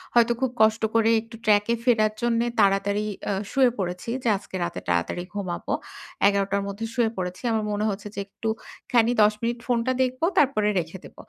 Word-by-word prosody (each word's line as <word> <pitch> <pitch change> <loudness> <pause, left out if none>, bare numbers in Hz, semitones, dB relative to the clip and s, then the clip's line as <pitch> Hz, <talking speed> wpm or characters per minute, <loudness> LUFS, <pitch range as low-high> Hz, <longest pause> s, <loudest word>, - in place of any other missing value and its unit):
হয়তো 240 0 +5
খুব 260 -2 +1
কষ্ট 220 +1 +4
করে 225 0 +4
একটু 225 +1 -13
ট্র্যাকে 210 +2 +3
ফেরার 215 -3 +3
জন্যে 235 0 +1
তাড়াতাড়ি 200 +1 +2 0.2
আ - - +1 0.2
শুয়ে 260 -2 +4
পড়েছি 180 +3 -3
যে, - - -1
"আজকে 195 -1 -10
রাতে 170 - -3
তাড়াতাড়ি 85 - 0
ঘুমাবো।" 190 -4 -3 0.5
১১ 200 -1 +2
টার 200 0 +1
মধ্যে 200 +3 -4
শুয়ে 235 -3 +2
পড়েছি। 180 0 -4
আমার 220 -1 0
মনে 210 +1 -1
হচ্ছে 205 +1 -5
যে - - -4
একটুখানি 225 +2 -1
১০ 210 0 +5
মিনিট 235 +1 -1
ফোনটা 240 0 +1
দেখব, 255 0 -3 0.2
তারপরে 255 -7 +3
রেখে 165 +2 -5
দেব। - - -14
215 Hz, 180 wpm, -25 LUFS, 200-235 Hz, 0.5 s, হয়তো